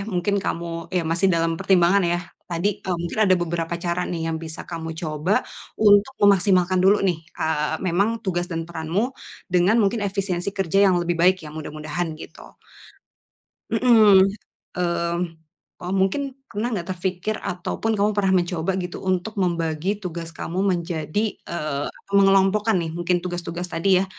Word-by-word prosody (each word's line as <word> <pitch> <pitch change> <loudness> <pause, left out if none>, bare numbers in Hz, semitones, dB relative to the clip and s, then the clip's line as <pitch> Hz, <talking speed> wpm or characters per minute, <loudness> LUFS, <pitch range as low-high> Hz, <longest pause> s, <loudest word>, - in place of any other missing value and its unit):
mungkin 190 +3 +1
kamu, 170 +1 -2 0.3
ya 180 - +2
masih 185 +3 +2
dalam 165 0 +1
pertimbangan 185 +1 +4
ya. 175 - 0 0.3
Tadi, 175 +3 0 0.2
e - - -6
mungkin 175 +5 -4
ada 185 - +6
beberapa 170 0 -2
cara 175 0 0
nih 170 - -3
yang - - -2
bisa 160 0 -7
kamu 165 -1 -5
coba, 155 +2 -2 0.4
untuk 210 +4 +5
memaksimalkan 190 -2 +4
dulu 200 +2 +6
nih, 175 -4 +1 0.2
eee, 160 0 0
memang 185 +4 +2 0.2
tugas 175 -2 -1
dan 165 0 -2
peranmu, 170 +10 -2 0.4
dengan 180 +5 +4
mungkin 210 +3 +1
efisiensi 190 -2 -2
kerja 195 0 +1
yang 185 - +3
lebih 175 0 -1
baik 185 +2 +5
ya, 150 - -8
mudah-mudahan 155 +2 -4
gitu. - - -11 1.3
Mhm, 220 -4 +6 0.6
mmm, 170 -1 0 0.6
oh, 180 +1 -4
mungkin, 195 +9 +1 0.3
pernah 220 +4 -1
enggak 190 -7 -3
terpikir 185 +3 -2
ataupun 210 +5 -2
kamu 205 +1 +2
pernah 195 -2 +1
mencoba 175 +1 -1
gitu, 180 -1 -5
untuk 185 +3 -1
membagi 170 +2 -1
tugas 170 -4 -6
kamu 175 +3 -3
menjadi, 175 +2 -1
eee, 150 -4 -3 0.3
mengelompokkan 195 +1 +4
nih, 165 -2 -3
mungkin 175 +1 +1
tugas-tugas 175 0 -5
tadi 180 +2 +2
ya, 190 - +1
180 Hz, 150 wpm, -23 LUFS, 170-195 Hz, 1.3 s, ada